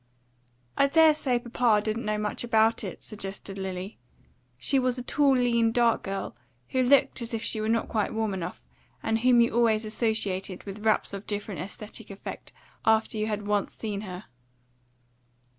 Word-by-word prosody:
"I 275 - +5
dare 315 +2 +6
say 260 -4 0
papa 240 -2 +2
didn't 220 +2 -2
know 210 0 0
much 210 +2 -2
about 225 -1 +3
it," - - -7
suggested 195 -1 -5
Lily. 190 +1 -5 0.6
She 270 - +2
was 255 -1 0
a 250 - -4
tall, 275 0 +3
lean, 235 -2 +3
dark 235 -1 +3
girl, 195 0 -4 0.3
who 260 - +1
looked 265 0 +4
as 230 0 -3
if 225 - -4
she 215 - 0
were 215 - -1
not 230 0 +1
quite 215 -2 -1
warm 220 -2 -1
enough, 175 - -6 0.4
and 225 0 +1
whom 245 0 +5
you 235 - +3
always 225 -2 +2
associated 205 -4 -1
with 205 +1 -8
wraps 215 - +2
of 200 +1 -7
different 205 -2 -4
aesthetic 210 +3 -8
effect 195 0 -8 0.3
after 220 0 +2
you 215 - 0
had 210 -1 -3
once 205 -1 -1
seen 205 -3 -4
her. 185 -1 -7
220 Hz, 175 wpm, -27 LUFS, 205-240 Hz, 0.6 s, dare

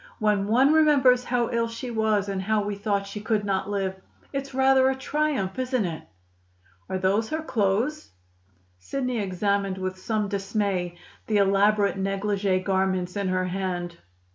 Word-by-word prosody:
When 210 -2 +1
one 260 +7 +4
remembers 275 -6 +5
how 240 -1 0
ill 235 -1 +1
she 230 +2 -6
was 215 -3 +1
and 195 -1 -2
how 210 +2 +1
we 205 0 -3
thought 200 0 -1
she 200 +1 -7
could 215 -1 0
not 195 0 -1
live, 190 -2 -2 0.3
it's 275 0 -3
rather 265 0 +4
a 265 - 0
triumph, 265 -7 -1
isn't 255 -4 0
it?" 165 -3 -4 0.9
"Are 190 - -1
those 195 +4 +1
her 315 0 -2
clothes?" 235 +4 0 0.7
Sidney 250 - -2
examined 200 0 -1
with 185 0 -4
some 215 +1 -1
dismay 195 -3 -2 0.3
the 215 - +2
elaborate 200 0 +3
negligee 195 -1 0
garments 190 -1 0
in 200 -1 -1
her 185 0 0
hand. 180 -2 -3
205 Hz, 155 wpm, -25 LUFS, 190-235 Hz, 0.9 s, remembers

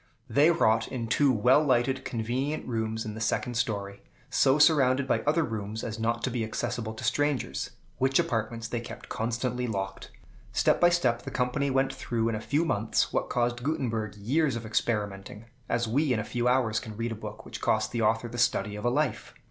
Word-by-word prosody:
They 145 +3 +4
wrought 115 -10 +3
in 120 -3 -4
two 135 +3 +4
well 125 +6 +4
lighted, 130 -1 +1
convenient 130 +6 -2
rooms 110 -2 -2
in 105 - -4
the 110 - -7
second 120 +2 0
story, 100 -4 -2 0.3
so 135 +2 +4
surrounded 140 -4 +4
by - - +2
other 160 +2 +3
rooms 110 -3 -4
as 110 -1 -4
not 115 +1 -1
to 130 - 0
be 115 -1 -1
accessible 115 0 -3
to - - -8
strangers, 145 -2 0 0.3
which 135 +1 +3
apartments 115 0 -1
they 120 0 -2
kept 120 - -10
constantly 120 +2 -2
locked. 95 -3 -4 0.4
Step - - +2
by 175 - +7
step, 125 -9 +1
the - - -6
company 125 +3 0
went 135 0 +1
through 115 -1 -1
in - - -2
a 110 - -4
few 150 +8 +1
months 110 -7 0
what - - 0
caused 120 0 0
Gutenberg 115 -7 -2
years 135 +7 +1
of 115 -1 -5
experimenting, 105 -1 -2 0.2
as 120 0 +1
we 140 +5 +1
in 120 - +2
a - - -2
few 120 +2 -1
hours 120 -4 +2
can 110 -2 -9
read 115 +1 -2
a - - -1
book 105 -1 -8
which - - -8
cost 110 0 +1
the 120 - -1
author 115 +2 +2
the 120 +1 -6
study 105 -3 +1
of 105 - -6
a - - +4
life. 145 +2 -1
120 Hz, 205 wpm, -28 LUFS, 110-130 Hz, 0.4 s, by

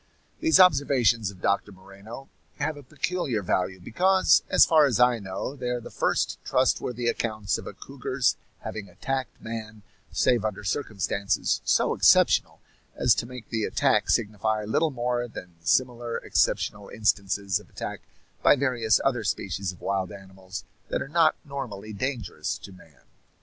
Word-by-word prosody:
These 325 -7 +4
observations 135 - +4
of 95 -2 -13
Doctor 100 +1 +1
Moreno 100 +7 -12 0.3
have 155 - -1
a 145 - -10
peculiar 140 - -2
value, 90 +1 -1
because, 185 - +3
as - - +6
far 155 -3 +5
as 120 -4 0
I 125 -1 +4
know, 95 +7 -5
they 125 -3 -4
are 125 0 -1
the - - -11
first - - 0
trustworthy 125 -1 0
accounts 110 -4 -1
of - - -9
a - - -6
cougar's 130 -2 -1 0.3
having 105 -2 -6
attacked 130 +8 -4
man 110 -2 -7 0.3
save 120 -4 +2
under 105 -2 -3
circumstances 100 -4 -1
so - - +3
exceptional - - +4 0.3
as - - +4
to 115 - -3
make 125 -1 -10
the 110 -1 -1
attack - - +1
signify 110 0 0
little 150 +10 +1
more 120 -2 -2
than 90 -6 -10
the - - -13
similar 120 -2 +1
exceptional 105 -1 0
instances 100 -2 0
of 105 - -18
attack - - -6 0.4
by - - +6
various 125 -5 +2
other 125 -4 +1
species 95 -1 -2
of 90 - -16
wild 95 -1 -1
animals 95 -1 -9 0.3
that - - -1
are 135 - -11
not 165 0 +4
normally 115 -7 -6
dangerous 125 +3 -3
to 100 - -12
man. 80 -5 -18
115 Hz, 155 wpm, -26 LUFS, 100-130 Hz, 0.4 s, as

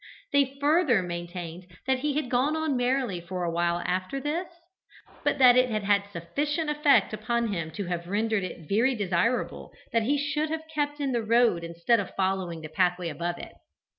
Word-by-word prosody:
They 275 -1 +2
further 290 - +3
maintained 175 0 -6 0.2
that 265 0 +1
he 290 +1 -1
had 300 -3 0
gone 265 +5 +2
on 315 -3 0
merrily 245 -7 0
for 180 +1 -4
a 170 - -1
while 170 +1 0
after 185 +9 -1
this, 310 +6 -2 0.8
but - - +1
that 250 -2 +7
it 255 0 +4
had 215 -2 -1
had 200 0 +2
sufficient 290 - -2
effect 295 -6 +3
upon 235 +2 -1
him 165 -4 -3
to 200 +5 -5
have 175 -1 -4
rendered 215 +1 0
it 170 -3 -7
very 235 - +2
desirable 200 +3 -1 0.2
that 230 - +3
he 275 +6 +1
should 290 +2 -1
have 320 0 -4
kept 295 -1 -1
in 280 -2 -1
the 240 -2 0
road 230 -5 +3
instead 170 +8 +1
of 200 - -5
following 185 -3 -1
the 155 - -6
pathway 175 +2 +1
above 170 +3 -3
it. - - -9
220 Hz, 190 wpm, -27 LUFS, 175-275 Hz, 0.8 s, that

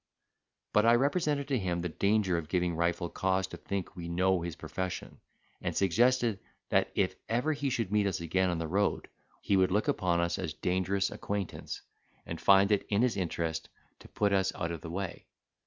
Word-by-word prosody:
But 105 - +5
I 115 +1 +6
represented 140 +1 +1
to 135 -3 +1
him 90 -3 -1
the 90 - -1
danger 100 +1 +2
of 80 -2 -3
giving 90 -1 +1
Rifle 85 +1 0
cause 95 +2 0
to - - -9
think 100 -1 -4
we 85 -2 -6
know 90 +1 +2
his 85 -1 -4
profession, 95 +1 -5 0.4
and - - -2
suggested 115 +3 +3 0.3
that, - - +2
if - - +2 0.2
ever 125 +7 +1
he 145 -1 -1
should 115 -6 -1
meet 105 -1 +3
us 95 -1 -1
again 90 +3 +1
on 85 - -1
the 80 0 -2
road, 100 +5 0 0.3
he 100 - +1
would 95 -1 +4
look 105 +3 +1
upon 90 -2 +1
us 85 0 0
as 75 - -3
dangerous 95 +3 0
acquaintance, 100 -2 -4 0.4
and 85 -1 -6
find 100 +3 +6
it 105 - +1
his 115 +4 +2
interest 80 -3 -2 0.3
to - - -13
put 100 -1 0
us 95 -1 +2
out 85 -1 -2
of 85 - -5
the 80 - -7
way. 95 +1 -5
95 Hz, 190 wpm, -31 LUFS, 85-105 Hz, 0.4 s, I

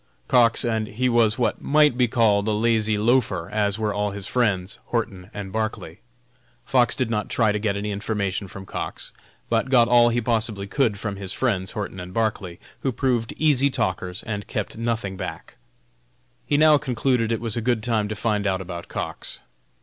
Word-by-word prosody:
Cox, 120 -3 +4
and 110 -2 0
he 125 +5 0
was 115 -2 +3
what 125 - 0
might 150 -2 +4
be 125 -1 +3
called 110 -3 +2
a 110 - +2
lazy 110 -1 +2
loafer, 105 -6 +1
as 105 -1 0
were 110 -2 -1
also 105 0 -1
his 100 -1 -5
friends, 100 -6 0
Horton 100 -6 -3
and 100 -2 -7
Barclay. 110 -6 -3 0.7
Fox 125 -2 +3
did 125 -3 -1
not 105 -2 -1
try 110 -3 +2
to 105 - -1
get 100 -1 -1
any 105 +1 -3
information 100 -1 -2
from 95 +1 -10
Cox, - - -6 0.3
but 115 +3 0
got 120 -3 +5
all 120 -1 +6
he 120 +1 +1
possibly 110 -3 -1
could 110 0 0
from 100 0 -4
his 95 -1 -4
friends, 100 -8 -1
Horton 100 -3 -5
and 90 +1 -8
Barclay, 105 -6 -1 0.2
who 135 - -1
proved 120 -3 -1
easy 140 -3 +4
talkers 90 -4 -2
and 105 -2 -5
kept 105 - -4
nothing 115 -4 -2
back. - - -7 0.9
He 145 - +2
now 155 -1 +6
concluded 125 -3 0
it 115 - 0
was 115 -3 -2
a 120 - -1
good 115 -1 0
time 115 -3 0
to 110 - -4
find 105 -2 0
out 95 -1 0
about 85 -2 -7
Cox. - - -5
110 Hz, 190 wpm, -23 LUFS, 100-120 Hz, 0.9 s, all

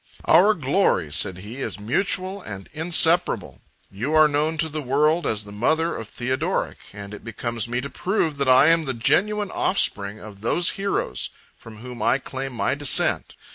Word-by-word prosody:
"Our 195 +7 +5
glory," 135 - 0
said 90 +4 +1
he, 115 +5 -9
"is 135 - -5
mutual 185 - -1
and 100 - -8
inseparable. 165 +2 +2 0.3
You 120 +11 -3
are 155 0 +6
known 150 +2 -1
to 160 0 +1
the 155 0 -5
world 150 +5 +1
as 105 -1 0
the 100 - -12
mother 160 +11 0
of 115 - -7
Theodoric; 130 - -3
and 100 0 -9
it - - -10
becomes 115 0 -4
me 120 +1 -2
to 140 - -6
prove, 170 -5 -1
that 140 -2 +1
I 130 +4 +6
am 165 -1 +3
the 130 -3 -3
genuine 205 - +1
offspring 100 - 0
of 105 -2 -12
those 170 +10 +2
heroes 200 0 -2 0.3
from 110 -1 -13
whom 125 -3 -9
I 125 - +2
claim 135 0 -6
my 120 - -1
descent." 145 0 +2
135 Hz, 175 wpm, -23 LUFS, 115-165 Hz, 0.3 s, are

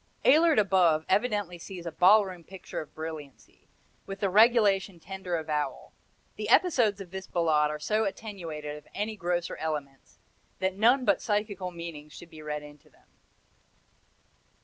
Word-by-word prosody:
Ehlert 315 +3 +5
above 180 -6 +3
evidently 205 -6 0
sees 175 0 -9
a 170 - -4
ballroom 185 0 +4
picture 190 +2 -7
of 155 - -13
brilliancy, 155 -4 -9 0.4
with 195 0 -6
the 195 -2 0
regulation 205 -4 +4
tender 190 0 -5
avowal. 155 -2 -3 0.4
The - - -4
episodes 240 - +3
of 180 -3 -10
this 190 0 -7
Ballade 155 -3 +2
are 150 - -3
so 215 +9 0
attenuated 165 -8 -6
of 150 - -15
any 215 +2 -2
grosser 175 -2 -2
elements 145 -4 -5 0.4
that 190 0 -1
none 245 +6 +4
but 200 - +3
psychical 205 -3 -2
meanings 170 -4 -9
should 175 - -12
be 155 -1 -11
read 150 -1 -4
into 150 0 -15
them. - - -29
180 Hz, 150 wpm, -28 LUFS, 155-205 Hz, 0.4 s, Ehlert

